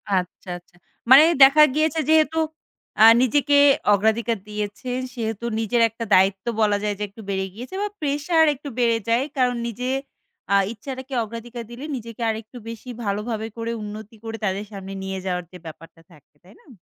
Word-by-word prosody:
আচ্ছা, 180 0 -4
আচ্ছা। 175 0 -21 0.4
মানে 280 +4 +10 0.2
দেখা 290 +3 +8
গিয়েছে 315 +1 +1
যেহেতু, 315 0 +3 0.6
অ্যা 220 - +7 0.2
নিজেকে 285 +3 +3 0.4
অগ্রাধিকার 220 +2 +1
দিয়েছেন। 210 +5 -4
সেহেতু 225 -2 -4
নিজের 230 +1 +1
একটা 230 +1 -6
দায়িত্ব 195 +2 +2 0.2
বলা 205 -1 +3
যায় 205 -1 -1
যে, - - -2
একটু 220 +3 -13
বেড়ে 190 0 -1
গিয়েছে 250 - -9
বা 415 - 0
প্রেশার 300 +3 +2
একটু 285 +2 -9
বেড়ে 230 -1 +3
যায়। 240 +4 +2
কারণ 250 -1 +2
নিজের, 250 +4 -3 0.6
আ - - +6 0.2
ইচ্ছাটাকে 260 +3 -8
অগ্রাধিকার 230 +2 -8
দিলে, 255 +5 -8
নিজেকে 230 -1 -8
আরেকটু 220 +2 -6
বেশি 230 +2 -9 0.2
ভালোভাবে 215 +2 -2
করে, 230 0 -3
উন্নতি 215 +1 -8
করে, 225 0 -5
তাদের 195 +2 -2
সামনে 195 -1 -8
নিয়ে 190 0 -4
যাওয়ার 180 -2 -2
যে 180 - -10
ব্যাপারটা 165 +1 -12
থাকে। 150 -1 -22
তাই 190 +4 -18
না? - - -27
225 Hz, 170 wpm, -23 LUFS, 205-255 Hz, 0.6 s, মানে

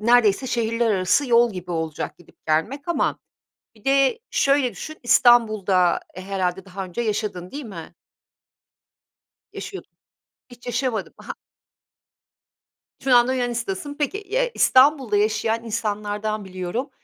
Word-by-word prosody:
neredeyse 235 +1 +4
şehirler 230 -1 0
arası 195 +8 +2
yol 235 -1 +4
gibi 180 -1 -7
olacak 160 -1 -4
gidip 175 - -22
gelmek 225 - -1
ama 345 - 0 0.6
bir 215 - -23
de 275 - +3
şöyle 275 -2 +2
düşün, 310 - -8
İstanbul'da 215 -7 +4
herhâlde 185 -1 -3
daha 190 0 -6
önce 180 +5 -5
yaşadın, 210 -5 -3
değil 290 0 -6
mi? 175 -6 -9 1.6
Yaşıyordun, 390 - -8 0.6
hiç 245 0 -15
yaşamadın. 245 -1 -2
Aha! - - -7 1.7
Şu 265 -1 +3
anda 245 +2 +4
Yunanistan'dasın. 240 0 -3
Peki, 300 +7 -1
eee, - - -1
İstanbul'da 260 -5 +4
yaşayan 220 +2 0
insanlardan 210 -1 -3
biliyorum. 185 +8 -4
225 Hz, 115 wpm, -23 LUFS, 195-255 Hz, 1.7 s, neredeyse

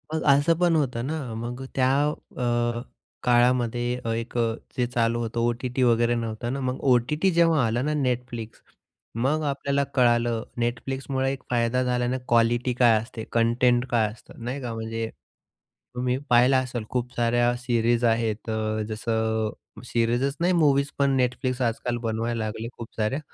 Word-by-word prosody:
मग 160 - -1
असं 145 +4 +3
पण 175 -2 +3
होतं 125 -6 0
ना 145 -6 -4
मग 120 +3 -5
त्या 130 -1 +3 0.5
अ, 120 -1 0 0.4
काळामध्ये 120 -1 +3 0.4
एक 115 +1 -6
अ, 115 -1 +1 0.2
जे 125 - +2
चालू 120 -1 0
होतं, 115 0 -3
ओ-टी-टी 120 +2 0
वगैरे 120 0 +3
नव्हतं 115 +1 -3
ना? 140 - -3
मग 130 -1 -2
ओ-टी-टी 150 +10 +2
जेव्हा 165 -5 +3
आला 115 +2 0
ना 150 +3 0
Netflix, 125 -3 -2 0.7
मग 135 +7 +1
आपल्याला 140 -1 0
कळालं 120 -2 +3 0.2
Netflixमुळे 130 +3 -1
एक 135 - -9
फायदा 120 +1 +1
झाल्याने 125 0 0
क्वालिटी 120 +2 +2
काय 120 -2 +5
असते, 115 0 -8
कंटेंट 120 +1 +3
काय 115 -3 +3
असतं, 115 +1 -14
नाही 130 +4 -4
का? 120 -2 -4
म्हणजे 115 0 -4 0.9
तुम्ही 125 0 0
पाहिलं 125 +2 +5
असेल 125 -3 -2
खूप 125 0 -2
साऱ्या 120 +1 +2
सिरीज 120 -1 +1
आहेत, 115 -1 +2
तर 110 -1 -1
जसं 110 0 -1 0.4
सिरीजच 120 +4 0
नाही, 175 +2 +2
मूव्हीज 140 -4 +3
पण 135 -1 +3
Netflix 125 +1 -1
आजकाल 120 +1 -2
बनवायला 115 +1 -1
लागले 110 +1 -4
खूप 115 - -7
साऱ्या. 110 +6 0
120 Hz, 150 wpm, -25 LUFS, 115-130 Hz, 0.9 s, काय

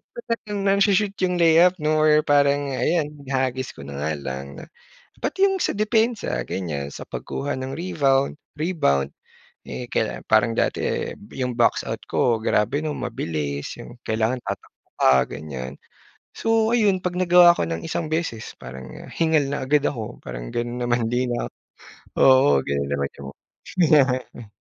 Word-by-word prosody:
talagang 230 - -4
nangshoo-shoot 200 0 +3
yung 180 - -1
layup 170 +2 +6
'no, 155 0 +2
or 150 0 +5
parang 145 -1 +2
ayan 150 +3 0 0.2
ihahagis 130 -1 -1
ko - - -11
na 70 0 -7
nga 75 +2 -1
lang 70 -1 -5 0.2
na - - -8 0.5
pati 325 +9 -2
yung 385 -1 0
sa - - 0
depensa 220 +2 +1
ganyan, 75 -7 -4
sa - - -7
pagkuha 140 +1 -4
ng 130 +1 -4
rebound, 140 -5 +1 0.2
rebound, 70 - +1 0.6
eh, 125 - -6
kaila 110 - -1
parang 110 +1 +4
dati, - - +1
eh, - - -2 0.2
yung 125 -2 -2
box 120 -1 +2
out - - -4
ko 115 -3 +1
grabe 120 +8 +1
'no, 155 - -2
mabilis 75 -3 -4
yung - - -10
kailangan 110 +3 0
tatakbo - - -8
ka, 65 - +6 0.2
ganyan. 70 -3 -6 0.6
So 225 0 +2
ayun 200 -5 +3
pag 180 0 -2
nagawa 175 -1 +6
ko - - 0
ng 80 0 -4
isang 165 0 -3
beses 160 -9 -2
parang 65 +1 -9 0.3
hingal 160 -4 +2
na 140 -1 -2
agad 145 +2 +2
ako 115 -7 -3
parang - - -7
gano'n 120 0 -3
naman 120 -1 +1
'di 120 +2 0
na, 120 - -2 0.7
oo 130 - +6
gano'n 70 0 -2
naman 70 -1 -1
yung 70 - -7 0.5
nangyari. 130 - +2
130 Hz, 155 wpm, -23 LUFS, -, 0.7 s, layup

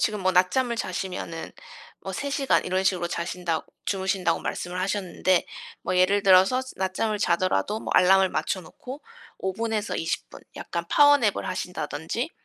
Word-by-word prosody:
지금 210 -2 0
뭐 185 0 +2
낮잠을 235 +7 +2
자시면은 180 -4 -4 0.5
뭐 - - -6
3 280 - -3
시간 275 -1 +2
이런 185 +1 0
식으로 185 -2 +1
자신다고 170 -1 -3 0.2
주무신다고 190 -1 0
말씀을 180 +1 -4
하셨는데 185 -2 +1 0.4
뭐 185 - -1
예를 195 +3 +3
들어서 190 +7 +6 0.2
낮잠을 195 +3 -1
자더라도 185 +4 +1
뭐 - - -3
알람을 190 +1 +6
맞춰놓고 250 - -4 0.4
5 190 - -2
분에서 225 0 -2
20 165 - -3
분. - - -12 0.2
약간 170 0 -4
파워 290 0 +6
냅을 210 -5 0
하신다든지 180 - -3
190 Hz, 335 characters per minute, -25 LUFS, 180-215 Hz, 0.5 s, 들어서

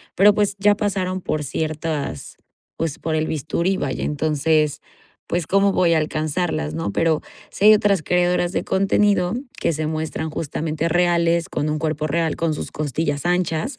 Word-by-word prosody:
pero 205 +2 +6
pues 205 -1 +1
ya 205 +1 +4
pasaron 190 -3 -2
por 155 -3 -2
ciertas, 155 - -4 0.4
pues, 160 -3 -3
por 160 - -3
el 155 0 0
bisturí, 170 +5 -1
vaya, - - -3
entonces, 150 0 +1 0.5
pues, 175 -2 -1
¿cómo 195 +3 +3
voy 170 -3 +3
a - - +3
alcanzarlas, 155 - -2
no? 80 +5 -2
Pero, 160 +5 +1 0.3
si 200 - -1
hay 215 - +10
otras 205 -4 +2
creadoras 175 +1 +1
de - - -1
contenido 195 0 +2 0.3
que - - +1
se 155 +1 -2
muestran 155 0 -3
justamente 155 +1 -2
reales 170 0 +2
con 150 - -2
un 155 - -1
cuerpo 155 -1 -2
real 165 +1 0
con 165 -2 -1
sus - - -6
costillas 145 +1 -2
anchas, 180 - 0
165 Hz, 165 wpm, -21 LUFS, 155-180 Hz, 0.5 s, hay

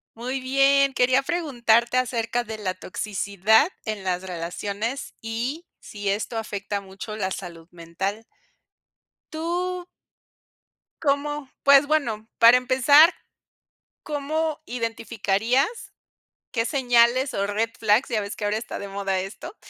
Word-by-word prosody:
Muy 255 +3 -3
bien, 275 +1 +3
quería 255 +2 +3
preguntarte 245 -8 +1
acerca 240 -1 0
de 220 -1 -7
la 185 -3 -2
toxicidad 200 - +1 0.2
en 215 -3 -4
las 180 -1 -1
relaciones, 200 +7 -4
y 240 +9 -4
si 205 -1 -7
esto 215 +3 -2
afecta 205 -2 -4
mucho 195 +2 -8
la 190 -2 -2
salud 170 -3 -8
mental. 175 +5 -4 1.1
Tú 355 +3 -2 1.2
cómo 285 -1 -1
pues 280 0 +6
bueno, 235 -8 0
para 235 +1 +8
empezar, 275 +6 +5 0.9
¿cómo 305 +1 -2
identificarías, 230 - -1 0.6
qué 230 -2 0
señales 250 -1 +3
o 200 - 0
red 210 +2 -1
flags, 215 +4 +3
ya 225 -4 0
ves 200 0 -5
que 220 - -5
ahora 205 +1 0
está 225 - -6
de 200 - -7
moda 195 -1 -2
esto, 195 - -8
230 Hz, 120 wpm, -24 LUFS, 205-275 Hz, 1.2 s, para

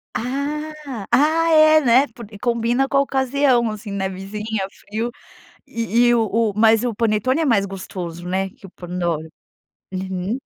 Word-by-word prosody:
Ah 285 +5 -3 0.4
ah 315 +5 +3
é 310 0 +7
né 260 +1 +4
porque 220 -2 -12
combina 240 +3 +1
com 275 - -1
a - - +6
ocasião, 265 -3 +2
assim, 210 -1 -7
nevizinha, 195 +2 -3
frio. 225 +3 -5 0.6
E 230 +1 +1
e 240 - +5
o 225 -1 +2 0.3
o - - -15
mas 225 +1 +4
o 235 -4 -2
panetone 230 +6 +1
é 320 - +1
mais 220 -7 +3
gostoso 180 -3 -7
né 190 +1 -1
que 195 - -17
o 195 - -11
Pandoro. 175 -3 -3 0.7
Uhum. 190 +4 -3
225 Hz, 155 wpm, -21 LUFS, 195-265 Hz, 0.7 s, é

